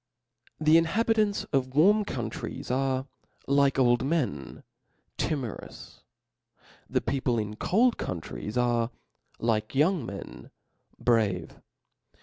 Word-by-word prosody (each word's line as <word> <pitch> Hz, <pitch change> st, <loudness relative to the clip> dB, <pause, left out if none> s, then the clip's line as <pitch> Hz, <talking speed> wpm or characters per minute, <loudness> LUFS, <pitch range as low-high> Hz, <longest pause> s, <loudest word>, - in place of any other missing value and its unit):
The 155 Hz, +1 st, +6 dB
inhabitants 215 Hz, +4 st, +1 dB
of 130 Hz, -1 st, 0 dB
warm 205 Hz, +7 st, +5 dB
countries 120 Hz, -, -5 dB
are, 130 Hz, 0 st, 0 dB, 0.4 s
like 140 Hz, 0 st, +3 dB
old 120 Hz, -2 st, +3 dB
men, 130 Hz, -, -2 dB, 0.5 s
timorous 130 Hz, -8 st, -4 dB, 0.6 s
i -, -, -34 dB, 0.3 s
the -, -, +1 dB
people 130 Hz, -3 st, 0 dB
in 105 Hz, -1 st, -3 dB
cold 230 Hz, -, +2 dB
countries 95 Hz, +6 st, -5 dB
are, 120 Hz, -1 st, +2 dB, 0.5 s
like 110 Hz, 0 st, -1 dB
young 155 Hz, +2 st, +3 dB
men, 100 Hz, -4 st, -8 dB, 0.5 s
brave. 105 Hz, -8 st, 0 dB
130 Hz, 105 wpm, -28 LUFS, 115-160 Hz, 0.6 s, The